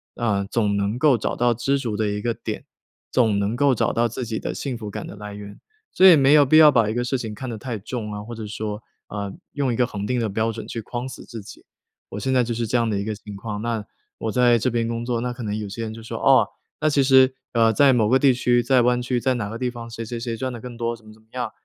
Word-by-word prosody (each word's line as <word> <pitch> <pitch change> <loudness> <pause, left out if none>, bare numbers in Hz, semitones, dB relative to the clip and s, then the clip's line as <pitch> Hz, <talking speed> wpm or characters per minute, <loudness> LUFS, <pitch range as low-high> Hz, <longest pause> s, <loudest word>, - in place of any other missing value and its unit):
啊， 105 -4 0
总 105 -1 0
能 100 +3 -1
够 145 -5 +4
找 - - -2
到 120 0 +2
知 130 +4 0
足 115 -6 -3
的 110 -1 0
一 105 0 -3
个 120 -1 0
点， - - -6 0.5
总 110 -5 +3
能 100 +3 -1
够 140 0 +3
找 - - 0
到 120 +1 +2
自 120 +2 -5
己 110 -1 -3
的 - - -4
幸 135 -3 -4
福 110 -2 -7
感 - - -6
的 - - -9
来 105 0 -8
源。 100 0 -10 0.3
所 190 - +7
以 180 - +10
没 140 0 +5
有 150 -1 +7
必 155 +4 +5
要 155 -2 +9
把 115 -5 +3
一 110 - -1
个 120 - 0
事 130 +2 -1
情 110 -3 -5
看 130 +4 -6
得 115 - -4
太 120 +1 -5
重 110 +1 -5
啊， 105 0 -6
或 120 +2 -8
者 110 -2 -6
说， 105 0 -5 0.3
呃 100 -1 -4 0.2
用 140 -4 0
一 - - -2
个 125 +1 +2
恒 105 -3 -5
定 125 -1 0
的 115 - 0
标 110 +3 0
准 115 - -8
去 115 - -5
框 120 +4 -5
死 130 - -9
自 115 - -8
己。 - - -13 0.4
我 100 - -6
现 130 +5 -1
在 125 -1 +4
就 120 - -4
是 115 0 -2
这 115 - -2
样 115 -1 +1
的 105 - 0
一 100 - -3
个 110 - -2
情 105 0 -10
况， 105 0 -5
那， 115 -3 -2 0.3
我 110 - -2
在 120 0 +4
这 130 - +1
边 115 -1 0
工 115 0 -3
作， 120 -2 -1
那 125 0 -2
可 120 - -8
能 105 -1 -2
有 105 -2 -5
些 115 +4 -5
人 110 0 -5
就 115 - -10
说： 115 - -6
“哦， - - +5 0.3
那 155 - +3
其 140 -2 +3
实， 130 -1 +5 0.2
呃， 115 -1 +4
在 140 +2 +5
某 110 -3 +2
个 130 - +5
地 135 -2 +5
区、 120 0 +2
在 125 +1 +4
湾 125 0 +2
区、 125 0 -1
在 130 +1 +1
哪 105 -4 -3
个 115 - -6
地 125 -1 0
方， 120 -1 -8
谁 115 0 -6
谁 120 +1 -5
谁 115 -1 -3
赚 130 +2 -3
得 120 - -7
更 125 -1 -8
多 115 0 -2
怎 110 -1 -20
么 110 - -13
怎 110 - -21
么 110 - -31
样， 125 -1 -3
115 Hz, 320 characters per minute, -23 LUFS, 110-125 Hz, 0.5 s, 以